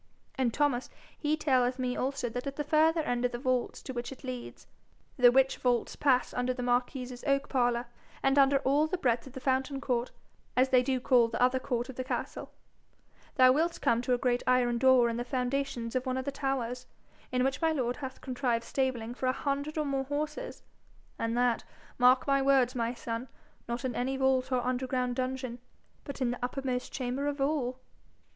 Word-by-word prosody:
And 260 -5 0
Thomas 270 -2 0 0.3
he 300 0 0
telleth 255 -4 +2
me 250 -1 -1
also 265 -1 -2
that 245 +4 -5
at 275 - -4
the 295 - -2
further 315 +2 +3
end 245 -5 -1
of 250 - +1
the 240 - -4
vaults 255 -1 -1
to 260 - -6
which 240 0 -4
it 270 - -11
leads, 255 -2 -7 0.5
the 245 -3 +6
which 265 +1 +3
vaults 245 -2 0
pass 255 -3 +2
under 250 0 -1
the 250 - -4
marquis's 245 0 -1
oak 275 -1 +1
parlour, 245 -2 +1 0.4
and 270 +1 +4
under 275 0 +5
all 290 +4 +3
the 370 - -2
breadth 245 -5 0
of 260 - -12
the 265 - -6
fountain 265 +1 0
court, 250 -3 -1 0.5
as 260 +1 +4
they 255 -1 +5
do 260 0 0
call 245 -2 +4
the 230 - -4
other 255 +1 +3
court 245 -2 -2
of 265 - -9
the 255 - -2
castle, 255 - -4 0.8
thou 255 -2 +7
wilt 330 +5 +1
come 235 0 +2
to 250 0 +1
a - - -2
great 245 -1 +1
iron 245 -2 +3
door 260 -2 +5
in 230 0 -2
the 240 - -2
foundations 250 -1 -2
of 255 +1 -1
one 255 0 0
of 260 - -3
the 280 - -1
towers, 265 -3 -3 0.4
in 250 0 +1
which 270 +3 -1
my 325 -1 +3
lord 250 -5 -1
hath 265 -2 -7
contrived 245 -3 -1
stabling 240 -2 -2
for 255 +1 -3
a - - +4
hundred 285 +3 -3
and 300 -2 -1
more 270 -1 -1
horses, 300 - -4 0.6
and 230 +1 -1
that, 245 -1 +2 0.4
mark 250 +1 +5
my 275 -1 +3
words, 270 -2 +3
my 235 -1 -1
son, 235 0 -5 0.4
not 235 +3 -3
in 255 - -1
any 260 +3 -1
vault 265 -1 +1
or 250 -1 +1
underground 250 0 -1
dungeon, 255 -1 -3 0.4
but 280 -2 -8
in 245 -2 +2
the 245 - -6
uppermost 255 0 -2
chamber 260 +2 -2
of 290 0 -2
all.' 270 -3 0
255 Hz, 205 wpm, -30 LUFS, 245-275 Hz, 0.8 s, thou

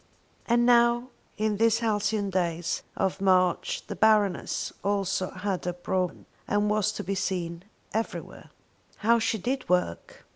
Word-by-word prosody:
And 240 0 +3
now 240 0 +4 0.3
in 215 -1 0
these 225 +1 +4
halcyon 210 -2 0
days 170 -2 -1 0.2
of 190 0 -1
March 185 -2 +2
the - - -6
Baroness 210 -4 +2
also 195 -2 0
had 190 0 -3
her 180 - -1
brougham 180 0 -2 0.2
and 205 0 +1
was 210 -1 +2
to 205 - -5
be 195 - -2
seen 180 -2 -3 0.3
everywhere. 225 +1 -4 0.6
How 235 +1 +5
she 220 0 0
did 255 +6 -3
work! 180 - -1
200 Hz, 140 wpm, -27 LUFS, 185-220 Hz, 0.6 s, How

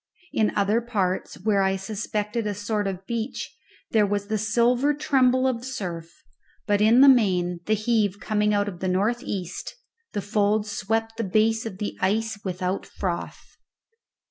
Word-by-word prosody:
In 215 - +2
other 205 +3 +2
parts, 200 -6 -2
where 200 0 +1
I 190 0 +2
suspected 210 +2 -3
a 205 - -2
sort 205 0 -2
of 190 0 -5
beach, 235 +2 -4 0.4
there 220 -2 +4
was 205 0 -2
the 215 - +1
silver 240 +6 +2
tremble 260 -3 +3
of 245 -2 -1
surf; 185 - -6 0.4
but 205 -1 +2
in 225 +4 +6
the 280 - +9
main, 180 -9 +3
the 215 - +3
heave 215 -2 +1
coming 210 -1 +1
out 205 0 +1
of 180 -4 -6
the 185 - -2
north 205 +6 +1
east, 190 - -5 0.4
the 205 - -1
folds 210 +1 +1
swept 225 +2 -2
the 230 - -1
base 220 +3 +1
of 190 -4 -8
the 210 - -4
ice 220 +3 0
without 185 0 -3
froth. 175 -3 -5
210 Hz, 165 wpm, -25 LUFS, 195-225 Hz, 0.4 s, the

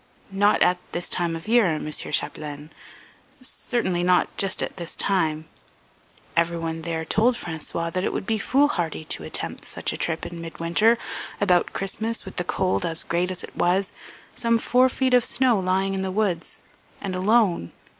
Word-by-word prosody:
"Not 205 +2 +4
at 180 0 +3
this 175 +1 -1
time 170 -2 -1
of 165 +5 -8
year, 235 -1 +5
Mr. 150 0 -4
Chapdelaine, 150 0 -3 0.7
certainly 235 -7 -2
not 180 0 +2
just 195 -1 +2
at - - -5
this 170 -2 -5
time. 160 -5 0 0.9
Everyone 165 -1 0
there 160 -1 -3
told 230 +9 +3
François 165 -2 -4
that 185 0 -1
it - - 0
would - - -3
be 220 +1 0
foolhardy 195 - +1
to - - -2
attempt - - -4
such - - -2
a - - -5
trip 160 -1 -1
in 170 -1 -7
midwinter, 170 +7 +2 0.4
about 180 -4 +2
Christmas, 220 +4 -2
with 190 - -10
the 180 - 0
cold 185 +1 0
as 165 -1 0
great 175 +2 0
as 185 -1 -3
it - - -10
was, 190 +2 +1 0.4
some 230 -1 +2
four 250 +3 +3
feet 260 0 0
of 250 -1 +6
snow 250 -4 +3
lying 190 +1 +1
in 190 - -2
the 190 - -2
woods, 185 -4 -1 0.4
and 195 -2 -4
alone. 185 - +2
185 Hz, 170 wpm, -24 LUFS, 170-215 Hz, 0.9 s, of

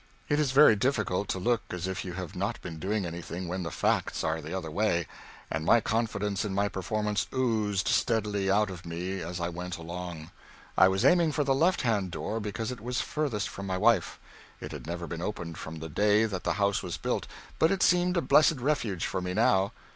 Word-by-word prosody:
It 145 - +2
is 145 -4 +2
very 135 -4 +7
difficult 105 -5 0
to - - -1
look 115 +5 +1
as 90 0 -4
if 95 -1 -3
you 90 - -6
have 90 -2 -6
not 100 +5 -2
been 80 -2 -6
doing 100 +3 -1
anything 85 +1 -5
when 90 +2 -3
the 85 - -3
facts - - 0
are 80 0 -1
the 80 +2 -8
other 90 -4 -4
way, 85 -2 +1 0.5
and 80 - -1
my 115 - +5
confidence 105 -3 -1
in 100 -3 -3
my 100 +1 +1
performance 105 +2 -1
oozed 110 -7 0
steadily 105 -4 +1
out 105 0 +3
of 90 -2 -9
me 90 +3 -4
as 85 +2 -5
I 85 0 -1
went 90 +1 -5
along. 85 -1 -7 0.4
I 95 - +7
was 95 0 +1
aiming 170 -3 +5
for 150 - +1
the 135 -1 +2
left 170 +7 +2
hand 105 -6 +1
door 105 +5 -3
because 105 +2 -3
it 125 - -7
was 125 +2 -2
furthest 140 -10 -1
from 100 0 -7
my 95 -1 -1
wife. 110 -3 +2 0.4
It - - -7
had - - -8
never 85 +1 -4
been 85 -1 -5
opened 85 -5 -4
from 80 - -7
the 80 0 -6
day 105 +6 +3
that 95 -4 -4
the - - +2
house 100 -1 +1
was 90 -3 -4
built, - - -2 0.3
but 160 - +5
it 195 0 +1
seemed 180 0 +3
a - - +3
blessed 155 0 +5
refuge 120 - 0
for - - -2
me 90 0 -3
now. 100 -2 +3
100 Hz, 220 wpm, -29 LUFS, 90-115 Hz, 0.5 s, very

